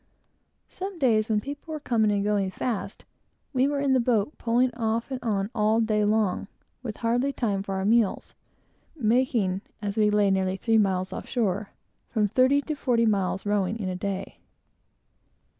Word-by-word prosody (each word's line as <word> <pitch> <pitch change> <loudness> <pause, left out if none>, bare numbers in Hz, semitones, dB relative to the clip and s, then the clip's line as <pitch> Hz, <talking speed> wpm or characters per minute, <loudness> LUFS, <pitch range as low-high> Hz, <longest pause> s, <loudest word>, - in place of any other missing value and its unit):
Some 380 0 -6
days, 225 -7 +2
when 210 -1 +2
people 285 +5 -7
were 310 - -3
coming 225 -6 +1
and 200 -1 +1
going 205 -2 +1
fast, 200 0 -4 0.5
we 260 +1 +3
were 285 0 -1
in 275 -1 +2
the 260 - +4
boat, 235 +1 +1
pulling 245 +2 +2
off 230 +1 -2
and 260 - -2
on, 205 -3 -1
all 215 +1 +2
day 215 -2 +2
long, 210 -2 +1 0.3
with 225 -4 -6
hardly 245 +4 +1
time 210 -7 -1
for 195 -1 -4
our 190 0 -2
meals; 225 -1 +1 0.6
making, 225 - +1 0.2
as 205 0 -4
we 210 -1 +4
lay 205 -1 +3
nearly 190 0 0
three 225 +2 +2
miles 190 -2 +1
from - - -4
shore, 210 -4 -1 0.4
from 215 -3 +1
forty 260 +6 +3
to 310 - -3
fifty 245 -5 +1
miles' 195 -3 0
rowing 205 0 0
in 195 -4 -3
a 185 - -3
day. 195 +1 -4
220 Hz, 175 wpm, -26 LUFS, 200-245 Hz, 0.6 s, the